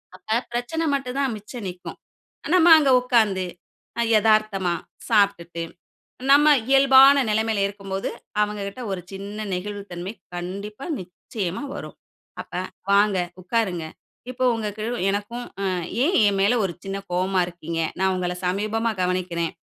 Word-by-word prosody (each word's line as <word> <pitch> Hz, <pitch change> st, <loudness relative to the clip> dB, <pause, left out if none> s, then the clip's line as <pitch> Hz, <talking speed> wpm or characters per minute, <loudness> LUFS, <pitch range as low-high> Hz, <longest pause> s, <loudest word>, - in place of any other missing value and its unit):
அப்ப 220 Hz, +6 st, -1 dB
பிரச்சனை 245 Hz, +8 st, -2 dB
மட்டும் 270 Hz, -1 st, -4 dB
தான் 270 Hz, -4 st, +1 dB
மிச்சம் 210 Hz, +2 st, -9 dB
நிக்கும். 180 Hz, 0 st, -9 dB, 0.6 s
நம்ம 350 Hz, -1 st, +6 dB
அங்கே 285 Hz, -3 st, +3 dB
உட்காந்து 220 Hz, -7 st, +2 dB, 0.6 s
அ -, -, +3 dB, 0.2 s
எதார்த்தமா 215 Hz, -4 st, +2 dB, 0.4 s
சாப்பிட்டுட்டு. 200 Hz, -6 st, +1 dB, 0.7 s
நம்ம 295 Hz, +2 st, +7 dB, 0.2 s
இயல்பான 270 Hz, 0 st, +7 dB
நிலைமையில 220 Hz, -1 st, +1 dB
இருக்கும்போது, 195 Hz, -1 st, -4 dB, 0.3 s
அவங்க 210 Hz, 0 st, -2 dB
கிட்ட 200 Hz, +6 st, -7 dB
ஒரு 190 Hz, -, -3 dB
சின்ன 205 Hz, +2 st, -6 dB
நெகிழ்வுத் 200 Hz, +2 st, -6 dB
தன்மை 175 Hz, +3 st, -5 dB, 0.2 s
கண்டிப்பா 200 Hz, +7 st, -6 dB, 0.2 s
நிச்சயமா 185 Hz, +2 st, -5 dB
வரும். -, -, -8 dB, 0.5 s
அப்ப -, -, -27 dB, 0.4 s
வாங்க 200 Hz, 0 st, +4 dB, 0.3 s
உட்காருங்க 185 Hz, -4 st, -1 dB, 0.4 s
இப்போ 255 Hz, 0 st, -2 dB
உங்களுக்கு 215 Hz, -1 st, -4 dB, 0.3 s
எனக்கும், 205 Hz, +5 st, -3 dB, 0.2 s
ம் 180 Hz, -3 st, -1 dB, 0.2 s
ஏன் 350 Hz, +6 st, +1 dB
என் 200 Hz, -1 st, +2 dB
மேல 200 Hz, +5 st, +4 dB
ஒரு 185 Hz, -, -1 dB
சின்ன 195 Hz, 0 st, -4 dB, 0.2 s
கோவமா 185 Hz, +1 st, +1 dB
இருக்கீங்க? 170 Hz, -1 st, -5 dB, 0.2 s
நான் 190 Hz, 0 st, +2 dB
உங்களை 180 Hz, -1 st, -2 dB
சமீபமா 215 Hz, +5 st, 0 dB
கவனிக்கிறேன், 180 Hz, -2 st, -1 dB
205 Hz, 130 wpm, -23 LUFS, 185-230 Hz, 0.7 s, நம்ம